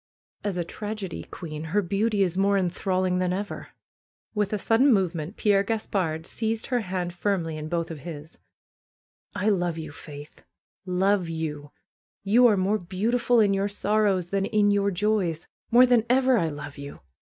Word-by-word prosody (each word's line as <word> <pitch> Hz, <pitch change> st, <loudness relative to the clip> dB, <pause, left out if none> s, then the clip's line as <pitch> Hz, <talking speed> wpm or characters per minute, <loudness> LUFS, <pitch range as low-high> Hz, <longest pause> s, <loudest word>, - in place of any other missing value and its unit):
^^As 200 Hz, -3 st, -2 dB
a 175 Hz, -, 0 dB
tragedy 210 Hz, -1 st, -6 dB
queen 155 Hz, -3 st, -7 dB
her 200 Hz, +6 st, 0 dB
beauty 200 Hz, +3 st, +1 dB
is 180 Hz, -2 st, -1 dB
more 200 Hz, +1 st, +3 dB
enthralling 185 Hz, 0 st, 0 dB
than 180 Hz, -1 st, 0 dB
ever." 200 Hz, +2 st, -4 dB, 0.7 s
With 210 Hz, -2 st, 0 dB
a 210 Hz, -, 0 dB
sudden 230 Hz, +7 st, +3 dB
movement 180 Hz, -3 st, 0 dB
Pierre 205 Hz, -2 st, +3 dB
Gaspard 195 Hz, -7 st, -2 dB
seized 225 Hz, +2 st, -2 dB
her 250 Hz, -2 st, 0 dB
hand 180 Hz, -4 st, -3 dB
firmly 175 Hz, -3 st, -1 dB
in 155 Hz, 0 st, -6 dB
both 170 Hz, -1 st, -2 dB
of 160 Hz, -, -7 dB
his. 155 Hz, +1 st, -9 dB, 1.0 s
love 185 Hz, -5 st, 0 dB
you. 155 Hz, -2 st, -6 dB
Faith! 145 Hz, 0 st, -11 dB, 0.4 s
Love 185 Hz, 0 st, +1 dB
you! 150 Hz, -3 st, -4 dB, 0.5 s
You 235 Hz, +5 st, +5 dB
are 210 Hz, -3 st, +3 dB
more 200 Hz, +3 st, +1 dB
beau 190 Hz, +5 st, -2 dB
tiful 245 Hz, -1 st, +3 dB
in 205 Hz, -2 st, +4 dB
your 195 Hz, +1 st, +1 dB
sorrows 205 Hz, -3 st, 0 dB
than 195 Hz, 0 st, +1 dB
in 210 Hz, -2 st, +3 dB
your 200 Hz, 0 st, +2 dB
joys. 185 Hz, -4 st, 0 dB, 0.2 s
More 245 Hz, +2 st, +7 dB
than 245 Hz, -3 st, +4 dB
ever 260 Hz, 0 st, +4 dB
I 170 Hz, -8 st, +1 dB
love 145 Hz, -1 st, -8 dB
you! 140 Hz, 0 st, -9 dB
195 Hz, 165 wpm, -26 LUFS, 170-210 Hz, 1.0 s, More